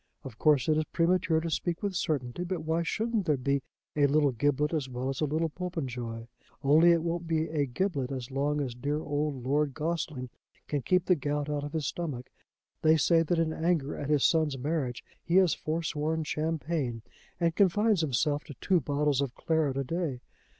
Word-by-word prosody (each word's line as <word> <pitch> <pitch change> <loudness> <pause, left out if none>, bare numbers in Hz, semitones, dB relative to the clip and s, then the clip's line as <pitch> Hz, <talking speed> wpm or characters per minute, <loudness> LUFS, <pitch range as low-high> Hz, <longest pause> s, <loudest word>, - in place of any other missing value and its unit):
Of 120 -5 -10
course 145 -5 +4
it 155 -1 +3
is - - +1
premature 170 0 +2
to 165 - -3
speak 170 +3 -2
with 200 -2 -1
certainty; 150 -3 -1
but 180 -2 -3
why 160 +1 0
shouldn't 215 +3 -1
there 150 -2 +3
be 140 +2 0 0.3
a 145 -1 +4
little 145 0 +3
Giblet 145 +5 +1
as 145 -5 -1
well 125 +1 -3
as 135 +2 -3
a - - +3
little 155 +3 0
Popenjoy? 125 -10 -5 0.4
Only 155 +5 +6
it 165 -1 +3
won't 170 0 -2
be 160 -1 +1
a 150 -3 0
Giblet 140 -2 -1
as 130 -1 -5
long 145 +2 0
as 130 -4 -3
dear 145 +5 -2
old 145 -3 -2
Lord 140 +1 +1
Gossling 155 -5 -3 0.4
can 145 -2 -1
keep 180 +5 +2
the 185 - +5
gout 145 -1 -2
out 145 -1 -2
of 145 - -6
his 155 -3 -1
stomach. 140 -6 -4 0.5
They 160 0 +5
say 165 +3 +4
that 165 +1 0
in 165 -1 +1
anger 160 -4 0
at 145 - -5
his 150 -3 +3
son's 155 -4 +2
marriage 135 -3 -2 0.2
he 170 - -1
has 185 -3 +5
forsworn 160 0 -2
champagne 155 -6 -2 0.4
and 165 -2 +1
confines 205 0 +3
himself 145 0 0
to 145 - -10
two 180 +9 +2
bottles 145 -2 +1
of 135 -3 -3
claret 160 -5 0
a 135 - 0
day. 150 -3 -3
150 Hz, 195 wpm, -29 LUFS, 140-165 Hz, 0.5 s, Only